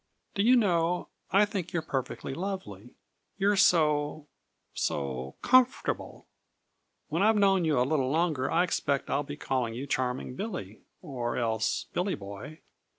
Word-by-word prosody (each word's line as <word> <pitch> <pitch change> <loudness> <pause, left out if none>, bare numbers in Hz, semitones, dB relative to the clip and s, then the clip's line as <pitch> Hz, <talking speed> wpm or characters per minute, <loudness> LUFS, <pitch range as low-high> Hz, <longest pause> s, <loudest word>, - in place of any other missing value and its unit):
"Do 200 - 0
you 240 +5 +6
know, 180 -6 +1 0.2
I 200 +2 +5
think 195 -4 -5
you're 165 -2 -1
perfectly 135 -2 -4
lovely. 150 - -6 0.4
You're 200 +1 +3
so 150 -5 +3 0.5
so 65 -1 -3
comfortable. 255 0 +2 0.8
When - - 0
I've 220 +2 +5
known 195 -3 +4
you 150 -5 +2
a 125 - +3
little 135 -2 +1
longer 155 -3 +1
I 170 - +3
expect 140 -5 -1
I'll 140 - +2
be 145 0 -7
calling 125 -6 -1
you 130 +4 -4
Charming 125 -1 -2
Billy, 180 - -6 0.2
or 125 -7 -3
else 110 -3 0
Billy 180 +3 0
Boy. 100 +10 -9
150 Hz, 145 wpm, -29 LUFS, 125-190 Hz, 0.8 s, you